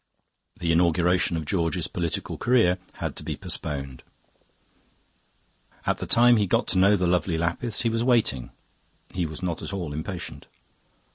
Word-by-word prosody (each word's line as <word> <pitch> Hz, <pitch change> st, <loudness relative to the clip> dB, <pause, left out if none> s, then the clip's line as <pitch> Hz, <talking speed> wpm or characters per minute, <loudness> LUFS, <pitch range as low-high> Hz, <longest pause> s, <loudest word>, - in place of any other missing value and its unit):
The 85 Hz, -2 st, 0 dB
inauguration 85 Hz, +1 st, +2 dB
of 80 Hz, -, -4 dB
George's 85 Hz, 0 st, 0 dB
political 85 Hz, -2 st, -3 dB
career 110 Hz, -7 st, +3 dB
had -, -, -4 dB
to -, -, -7 dB
be -, -, -4 dB
postponed. 70 Hz, -3 st, -3 dB, 1.8 s
At -, -, 0 dB
the -, -, -4 dB
time 120 Hz, 0 st, +6 dB
he 105 Hz, -2 st, +2 dB
got -, -, +2 dB
to 95 Hz, -, +1 dB
know 100 Hz, +2 st, +6 dB
the 90 Hz, -2 st, 0 dB
lovely 90 Hz, -1 st, +1 dB
Lapiths 85 Hz, +9 st, -1 dB
he 115 Hz, -, +2 dB
was 115 Hz, +1 st, 0 dB
waiting; 115 Hz, -, +2 dB, 0.6 s
he 90 Hz, -2 st, -1 dB
was 80 Hz, +4 st, -9 dB
not 85 Hz, -3 st, -2 dB
at -, -, -6 dB
all 85 Hz, -7 st, -4 dB
impatient. 85 Hz, +4 st, -6 dB
90 Hz, 155 wpm, -25 LUFS, 85-100 Hz, 1.8 s, time